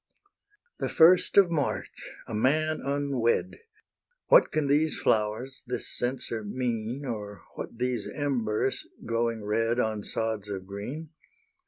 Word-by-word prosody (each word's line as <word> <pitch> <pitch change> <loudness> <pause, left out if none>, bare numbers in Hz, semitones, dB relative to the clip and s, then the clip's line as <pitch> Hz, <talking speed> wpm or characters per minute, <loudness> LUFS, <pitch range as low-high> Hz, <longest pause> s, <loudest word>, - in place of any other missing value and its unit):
The - - -1
first 175 +4 +5
of 190 -4 +7
March! 150 -4 -2 0.2
a - - -7
man 155 +8 +1
unwed! 140 +2 0 0.7
What - - +6
can 155 -1 0
these 150 +3 +2
flowers, 110 +5 0
this 125 - -3
censer 120 -3 -2
mean 120 +3 -3
Or 105 -4 -6
what - - -7
these 125 -3 -1
embers, 130 -4 0 0.2
glowing 115 -2 -1
red 115 +3 +1
On 110 -3 0
sods 110 -1 -2
of 95 -2 -5
green? 125 +12 -7
120 Hz, 125 wpm, -28 LUFS, 110-145 Hz, 0.7 s, of